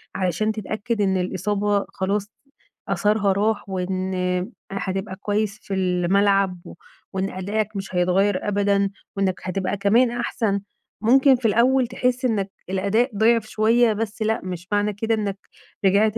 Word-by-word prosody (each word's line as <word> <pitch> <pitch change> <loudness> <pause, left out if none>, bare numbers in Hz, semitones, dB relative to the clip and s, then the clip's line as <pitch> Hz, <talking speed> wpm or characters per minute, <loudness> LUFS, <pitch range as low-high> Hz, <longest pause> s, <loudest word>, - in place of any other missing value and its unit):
علشان 190 +4 0
تتأكد 215 +1 -3
إن 190 -2 +2
الإصابة 200 +2 0
خلاص 200 +2 -2 0.6
أثرها 210 -2 +2
راح 205 +1 0
وإن 185 -1 -2 0.2
هتبقى 195 0 -3
كويس 205 +1 -2
في 195 - -5
الملعب 190 +1 +2
و - - -9 0.4
وإن 190 0 -1
أدائك 205 +3 -2
مش 195 -1 -6
هيتغيّر 185 +3 +2
أبدًا 200 -1 +2 0.3
وإنّك 190 -2 0
هتبقى 185 +2 -2
كمان 230 +5 +3
أحسن. 220 -4 -1 0.4
ممكن 265 +4 +5
في 245 -2 0
الأول 250 +3 +3
تحس 250 +1 -1
إنّك 205 -5 0 0.2
الأداء 200 +7 +1
ضِعِف 225 0 +3
شوية 225 +1 +3
بس 220 +1 -4
لأ، 220 +1 +1
مش 180 -1 -6
معنى 205 0 +1
كده 225 +3 0
إنّك 205 -2 -2 0.5
رجعت 210 +3 +3
205 Hz, 135 wpm, -23 LUFS, 190-220 Hz, 0.6 s, ممكن